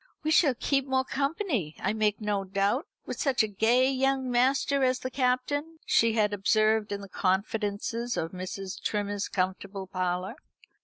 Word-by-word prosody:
"We 310 Hz, -, 0 dB
shall 300 Hz, -4 st, +4 dB
keep 275 Hz, +2 st, 0 dB
more 260 Hz, 0 st, +1 dB
company, 275 Hz, -, -1 dB
I -, -, -1 dB
make 210 Hz, -1 st, +1 dB
no 210 Hz, -2 st, -1 dB
doubt, 200 Hz, -, 0 dB, 0.2 s
with -, -, -6 dB
such 270 Hz, -6 st, +2 dB
a -, -, 0 dB
gay 235 Hz, +6 st, +3 dB
young 265 Hz, -1 st, 0 dB
master 270 Hz, +3 st, +2 dB
as 255 Hz, 0 st, +3 dB
the 255 Hz, 0 st, -5 dB
Captain," 280 Hz, +5 st, 0 dB
she 230 Hz, -1 st, +3 dB
had 210 Hz, -2 st, +2 dB
observed 215 Hz, +2 st, +2 dB
in 200 Hz, 0 st, -3 dB
the 200 Hz, -, -9 dB
confidences 205 Hz, +5 st, -1 dB
of 165 Hz, -, -2 dB
Mrs. 185 Hz, +1 st, -6 dB
Trimmer's 205 Hz, -1 st, -2 dB
comfortable 190 Hz, +1 st, -2 dB
parlour. 185 Hz, +4 st, -2 dB
220 Hz, 160 wpm, -28 LUFS, 200-260 Hz, 0.2 s, shall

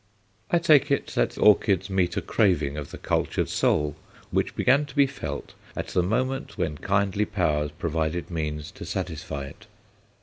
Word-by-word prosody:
I 175 Hz, -, +4 dB
take 155 Hz, -4 st, +5 dB
it 140 Hz, -, +1 dB
that -, -, 0 dB
orchids 100 Hz, -3 st, +4 dB
meet 95 Hz, -3 st, 0 dB
a -, -, +1 dB
craving 80 Hz, -10 st, +2 dB
of 75 Hz, -2 st, -5 dB
the -, -, -8 dB
cultured -, -, -1 dB
soul 75 Hz, -1 st, +1 dB, 0.4 s
which -, -, 0 dB
began 145 Hz, +3 st, +3 dB
to 140 Hz, -, -13 dB
be 140 Hz, -1 st, +6 dB
felt 135 Hz, -1 st, -6 dB, 0.2 s
at -, -, -4 dB
the 90 Hz, -, +2 dB
moment 130 Hz, +8 st, -1 dB
when 75 Hz, -, -2 dB
kindly 100 Hz, +1 st, +1 dB
powers 75 Hz, -7 st, 0 dB
provided 80 Hz, +2 st, -2 dB
means 75 Hz, -1 st, -3 dB
to -, -, -10 dB
satisfy 80 Hz, -6 st, -4 dB
it. 70 Hz, -, -13 dB
90 Hz, 165 wpm, -26 LUFS, 75-115 Hz, 0.4 s, be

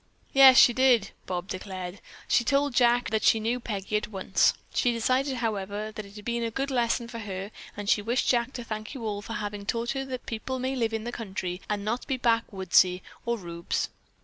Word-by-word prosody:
"Yes, 270 Hz, -1 st, +9 dB
she 240 Hz, -, +8 dB
did," 245 Hz, -5 st, +3 dB, 0.2 s
Bob 180 Hz, 0 st, -3 dB
declared. 185 Hz, -1 st, -6 dB, 0.3 s
"She 240 Hz, -, +3 dB
told 280 Hz, +2 st, +1 dB
Jack 240 Hz, -1 st, +3 dB
that 220 Hz, -1 st, +1 dB
she 225 Hz, -, +4 dB
knew 230 Hz, +3 st, -1 dB
Peggy 210 Hz, -3 st, -2 dB
at 210 Hz, -, -3 dB
once. 195 Hz, -2 st, +2 dB, 0.2 s
She 245 Hz, -, +2 dB
decided, 255 Hz, +4 st, +1 dB
however, 210 Hz, -2 st, -3 dB
that 215 Hz, -1 st, -7 dB
it 200 Hz, -, -16 dB
had 210 Hz, -1 st, -10 dB
been 235 Hz, 0 st, -1 dB
a 230 Hz, -, -1 dB
good 275 Hz, +5 st, -3 dB
lesson 235 Hz, -1 st, +1 dB
for 230 Hz, -1 st, -7 dB
her 195 Hz, -1 st, -5 dB, 0.3 s
and 205 Hz, -1 st, -5 dB
she 205 Hz, -, +3 dB
wished 235 Hz, +5 st, 0 dB
Jack 240 Hz, 0 st, +2 dB
to 245 Hz, -, -5 dB
thank 215 Hz, +2 st, -6 dB
you 240 Hz, -4 st, -6 dB
all 205 Hz, -1 st, -2 dB
for 225 Hz, -, -7 dB
having 205 Hz, -1 st, -4 dB
taught 230 Hz, +3 st, -1 dB
her 270 Hz, 0 st, -2 dB
that 255 Hz, -2 st, -6 dB
people 240 Hz, +3 st, -4 dB
may 260 Hz, +1 st, -2 dB
live 230 Hz, -3 st, 0 dB
in 220 Hz, -, -3 dB
the 240 Hz, -, -4 dB
country 190 Hz, -5 st, -5 dB
and 205 Hz, -1 st, -2 dB
not 235 Hz, +4 st, -2 dB
be 265 Hz, -, 0 dB
backwoodsy 190 Hz, -6 st, +2 dB, 0.2 s
or 235 Hz, 0 st, +1 dB
rubes." 170 Hz, -3 st, -3 dB
225 Hz, 215 wpm, -27 LUFS, 205-245 Hz, 0.3 s, Yes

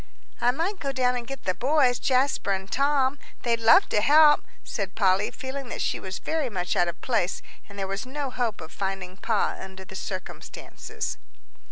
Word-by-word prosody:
"I 245 Hz, -, +4 dB
might 340 Hz, +10 st, -1 dB
go 275 Hz, -, -2 dB
down 250 Hz, -2 st, +1 dB
and 240 Hz, -1 st, -4 dB
get 275 Hz, -1 st, -7 dB
the 185 Hz, -, 0 dB
boys, 255 Hz, -, +3 dB
Jasper 255 Hz, -6 st, +2 dB
and 190 Hz, 0 st, -4 dB
Tom 275 Hz, 0 st, +2 dB, 0.2 s
they'd 235 Hz, -1 st, +1 dB
love 230 Hz, 0 st, +6 dB
to 210 Hz, -, +2 dB
help," 295 Hz, +4 st, +6 dB, 0.2 s
said 195 Hz, -5 st, -4 dB
Polly, 195 Hz, -1 st, +3 dB
feeling 265 Hz, -1 st, -6 dB
that -, -, -5 dB
she -, -, 0 dB
was 190 Hz, 0 st, -5 dB
very 315 Hz, -5 st, -1 dB
much 180 Hz, -4 st, -2 dB
out 175 Hz, -, +3 dB
of 170 Hz, 0 st, -4 dB
place, 220 Hz, -7 st, 0 dB, 0.3 s
and 200 Hz, -, -12 dB
there 195 Hz, -, -1 dB
was 195 Hz, +1 st, -3 dB
no 270 Hz, +1 st, -4 dB
hope 230 Hz, -7 st, -2 dB
of 160 Hz, +1 st, -9 dB
finding 190 Hz, -2 st, -4 dB
Pa 215 Hz, +1 st, 0 dB
under 190 Hz, 0 st, -9 dB
the 190 Hz, -, -11 dB
circumstances. 185 Hz, 0 st, -6 dB
235 Hz, 190 wpm, -26 LUFS, 190-270 Hz, 0.3 s, love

